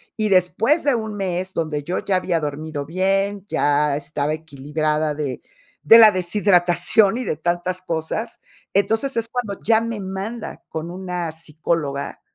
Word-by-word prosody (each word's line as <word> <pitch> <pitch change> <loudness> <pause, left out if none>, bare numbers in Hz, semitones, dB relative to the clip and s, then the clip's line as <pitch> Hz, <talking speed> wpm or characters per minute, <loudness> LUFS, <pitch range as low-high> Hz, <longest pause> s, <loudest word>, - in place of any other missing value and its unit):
y 215 -1 0
después 195 - +2
de 280 - +3
un 220 -2 -4
mes 185 -1 -3
donde 155 -3 -2
yo 175 +5 -2
ya 195 - 0
había 180 -2 0
dormido 150 -1 -4
bien, 195 +3 0
ya 145 0 +2
estaba 145 0 -2
equilibrada 155 0 -2
de 145 -3 -4 0.4
de 230 +1 +9
la 220 -1 +10
deshidratación 185 +2 +3
y 255 - -4
de - - -1
tantas 175 +2 -1
cosas. 170 +7 -3 0.3
Entonces, 225 +7 +1
es 230 0 0
cuando 225 -6 -4
ya 225 0 +4
me 230 -2 -4
manda 195 +4 -6
con 160 +1 -5
una 180 -2 -4
psicóloga 155 -2 -3
180 Hz, 150 wpm, -21 LUFS, 155-205 Hz, 0.4 s, la